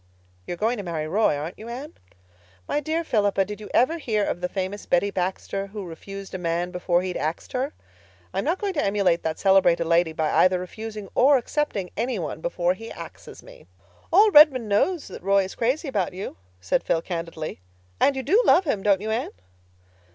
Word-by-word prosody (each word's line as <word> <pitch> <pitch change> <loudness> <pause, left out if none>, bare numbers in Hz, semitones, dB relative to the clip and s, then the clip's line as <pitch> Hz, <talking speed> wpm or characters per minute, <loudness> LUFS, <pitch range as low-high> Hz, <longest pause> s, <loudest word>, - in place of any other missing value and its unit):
You're 175 - -4
going 225 +6 0
to 205 - -5
marry 160 -4 -3
Roy, 195 -1 +2
aren't 155 +5 -6
you, 225 +2 -8
Anne?" 260 +5 -7 0.7
"My - - 0
dear 315 +3 -1
Philippa, 205 -8 +1
did 210 +1 -8
you 210 - -9
ever 320 +7 +2
hear 215 -8 0
of 175 - -3
the 180 - -1
famous 190 +2 -4
Betty 190 +3 +2
Baxter, 190 +2 -3
who 205 0 -7
'refused 195 +4 -9
a 185 - -4
man 175 +1 -1
before 180 0 0
he'd 185 -1 -3
axed 155 +2 -3
her'? 265 +3 -1 0.6
I - - -1
am - - -1
not 345 - +1
going 400 -1 -2
to 295 - 0
emulate 195 -4 +2
that 160 -1 -2
celebrated 190 -4 +4
lady 170 0 +3
by 160 -1 -1
either 185 0 +4
refusing 210 +3 -7
or 275 +2 +5
accepting 240 -7 -2
any 240 +1 -1
one 160 -2 -5
before 175 +1 0
he 225 +4 -9
'axes' - - -10
me." - - -15 0.4
"All 415 +5 +6
Redmond 295 - +7
knows 290 - +1
that 190 - -9
Roy 195 +1 +3
is 190 - -6
crazy 260 +7 -1
about 200 -9 -1
you," 190 - -6 0.2
said 90 +1 0
Phil 165 - 0
candidly. 165 - -5 0.4
"And 280 - +4
you 265 - -3
do 390 - +4
love 380 - +5
him, 215 -10 0
don't 200 -1 +3
you, 220 +1 -3
Anne?" 230 +3 -1
200 Hz, 205 wpm, -24 LUFS, 180-250 Hz, 0.7 s, Redmond